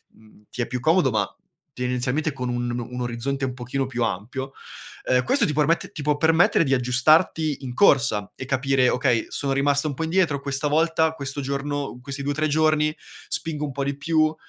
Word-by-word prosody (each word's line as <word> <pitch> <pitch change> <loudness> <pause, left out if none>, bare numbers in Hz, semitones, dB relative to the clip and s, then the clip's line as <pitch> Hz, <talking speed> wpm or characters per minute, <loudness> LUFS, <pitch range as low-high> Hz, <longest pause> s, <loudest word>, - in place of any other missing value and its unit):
mhmm, 110 -1 -21
ti 125 - -4
è - - -1
più 125 0 -4
comodo, 160 -3 +3
ma 105 -2 +1 0.5
tendenzialmente 125 +4 -1
con 125 -2 -4
un 120 0 -2
o 120 - -5
un 125 0 -5
orizzonte 125 +3 -2
un 130 - -3
pochino 125 +2 -3
più 120 -2 -2
ampio, 125 +6 -4 0.6
ehm, 125 0 +3
questo 275 - +3
ti 150 - -1
permette 155 +3 +1
ti - - -7
può 145 0 +1
permettere 165 +2 +4
di 135 -3 0
aggiustarti 145 +4 +2
in 125 -2 -6
corsa 120 - +3
e 130 - -7
capire: 130 -1 +2
"Okay, 125 -3 +1
sono 140 -1 -1
rimasta 140 +2 +2
un 145 - -2
po' 160 - -4
indietro 160 -3 +1
questa 140 +1 -1
volta, 160 +1 +2
questo 140 -2 -4
giorno, 140 -1 -3
questi 140 +2 -5
2-3 145 +2 0
giorni, 155 0 +2 0.3
spingo 155 -2 -2
un 145 - -5
po' 140 +1 -3
di 140 0 -2
più, 155 +1 +1
140 Hz, 195 wpm, -23 LUFS, 125-155 Hz, 0.6 s, permettere